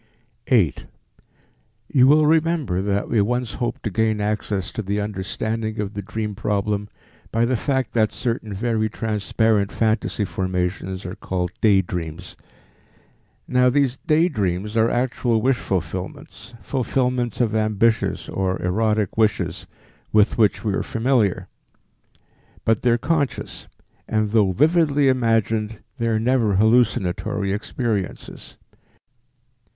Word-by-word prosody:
8. -, -, +2 dB, 1.1 s
You 130 Hz, -3 st, +6 dB
will 150 Hz, +2 st, +5 dB
remember 155 Hz, -, +1 dB
that 100 Hz, +1 st, -1 dB
we 110 Hz, -, +2 dB
once 120 Hz, +1 st, -1 dB
hoped 120 Hz, -, -3 dB
to 110 Hz, -, -2 dB
gain 110 Hz, +2 st, +1 dB
access 105 Hz, -2 st, -2 dB
to -, -, -4 dB
the 100 Hz, +1 st, -2 dB
understanding 110 Hz, +2 st, -3 dB
of 105 Hz, -1 st, -3 dB
the 100 Hz, -, -4 dB
dream 105 Hz, +2 st, -4 dB
problem 105 Hz, +1 st, -1 dB, 0.4 s
by 115 Hz, +1 st, +2 dB
the 130 Hz, +2 st, +1 dB
fact 130 Hz, -1 st, -1 dB
that 110 Hz, -2 st, +2 dB
certain 115 Hz, -3 st, -3 dB
very 110 Hz, +2 st, 0 dB
transparent 110 Hz, -1 st, 0 dB
phantasy 110 Hz, -1 st, 0 dB
formations 95 Hz, 0 st, -3 dB
are 90 Hz, -, -5 dB
called 95 Hz, -4 st, -3 dB
day 100 Hz, -3 st, +4 dB
dreams. 85 Hz, 0 st, -6 dB, 1.1 s
Now 125 Hz, 0 st, +4 dB
these 135 Hz, -1 st, +1 dB
day 160 Hz, +3 st, +2 dB
dreams 105 Hz, -, -2 dB
are 115 Hz, 0 st, +3 dB
actual 120 Hz, -2 st, 0 dB
wish 130 Hz, +2 st, +2 dB
fulfillments, 95 Hz, +5 st, -5 dB
fulfillments 125 Hz, -2 st, -1 dB
of 115 Hz, -3 st, +1 dB
ambitious 110 Hz, +1 st, +1 dB
or 95 Hz, -1 st, -1 dB
erotic 105 Hz, +2 st, 0 dB
wishes 95 Hz, -6 st, 0 dB, 0.4 s
with 105 Hz, 0 st, +4 dB
which 105 Hz, -4 st, +2 dB
we 105 Hz, -3 st, 0 dB
are -, -, 0 dB
familiar; 110 Hz, -6 st, 0 dB, 1.2 s
but 115 Hz, -1 st, +2 dB
they 125 Hz, -, +2 dB
are 120 Hz, -, +4 dB
conscious, 140 Hz, +2 st, -2 dB, 0.4 s
and 110 Hz, -1 st, 0 dB
though 105 Hz, -4 st, +3 dB
vividly 150 Hz, -, +3 dB
imagined, 115 Hz, -3 st, +1 dB, 0.2 s
they 115 Hz, -, 0 dB
are 110 Hz, -1 st, +1 dB
never 115 Hz, -3 st, +2 dB
hallucinatory 105 Hz, -3 st, +2 dB
experiences. 105 Hz, -2 st, -4 dB
110 Hz, 125 wpm, -22 LUFS, 100-120 Hz, 1.2 s, You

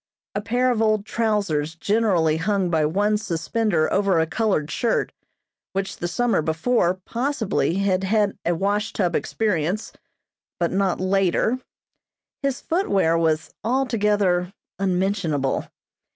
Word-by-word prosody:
A 205 Hz, -, -2 dB
pair 245 Hz, +4 st, +1 dB
of 230 Hz, -2 st, 0 dB
old 215 Hz, -2 st, +2 dB
trousers 200 Hz, -10 st, 0 dB
generally 180 Hz, -5 st, +2 dB
hung 190 Hz, +1 st, 0 dB
by 155 Hz, -2 st, +2 dB
one 205 Hz, +6 st, +1 dB
suspender 175 Hz, -1 st, 0 dB
over 195 Hz, -3 st, +2 dB
a 160 Hz, -, +3 dB
colored 160 Hz, -5 st, 0 dB
shirt, 230 Hz, +9 st, 0 dB, 0.6 s
which, 195 Hz, 0 st, -3 dB
the 175 Hz, -, -3 dB
summer 230 Hz, +3 st, +1 dB
before, 170 Hz, +4 st, +1 dB
possibly, 225 Hz, -, -1 dB
had 195 Hz, -1 st, +1 dB
had 205 Hz, 0 st, +1 dB
a 170 Hz, 0 st, +1 dB
wash 205 Hz, +4 st, -1 dB
tub 180 Hz, -4 st, 0 dB
experience, 200 Hz, -2 st, -1 dB, 0.7 s
but 170 Hz, -1 st, +1 dB
not 190 Hz, -1 st, +1 dB
later; 195 Hz, +5 st, +1 dB, 0.8 s
his 275 Hz, -2 st, -1 dB
footwear 200 Hz, -, +1 dB
was 160 Hz, -2 st, +1 dB
altogether 210 Hz, -7 st, +1 dB, 0.3 s
unmentionable. 185 Hz, -7 st, 0 dB
195 Hz, 125 wpm, -23 LUFS, 170-215 Hz, 0.8 s, a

